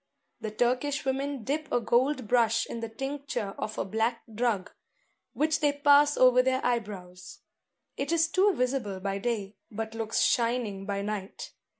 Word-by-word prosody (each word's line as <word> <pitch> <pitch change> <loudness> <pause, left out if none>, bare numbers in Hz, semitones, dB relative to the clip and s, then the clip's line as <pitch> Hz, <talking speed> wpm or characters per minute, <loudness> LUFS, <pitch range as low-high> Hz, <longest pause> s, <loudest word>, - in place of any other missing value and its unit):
The 215 - -4
Turkish 250 +6 0
women 270 -1 -2
dip 300 +5 -3
a - - +3
gold 250 +2 +1
brush 230 -1 +3
in 235 - -6
the 230 -1 -5
tincture 270 -4 -4
of 215 - -4
a - - -1
black 225 +4 -1
drug, 220 -4 -1 0.6
which 315 +1 +1
they 290 -1 +2
pass 290 0 +5
over 255 0 +6
their 260 +1 0
eye 245 -1 +3
brows. 185 -4 -11 0.6
It 275 - -2
is 330 -1 +3
too 380 +4 +3
visible 250 -7 -1
by 195 +1 -2
day, 205 -3 -3
but 220 +1 -5
looks 225 -1 -1
shining 230 -5 0
by 200 -1 -2
night. 205 -2 -5
240 Hz, 165 wpm, -28 LUFS, 215-275 Hz, 0.6 s, over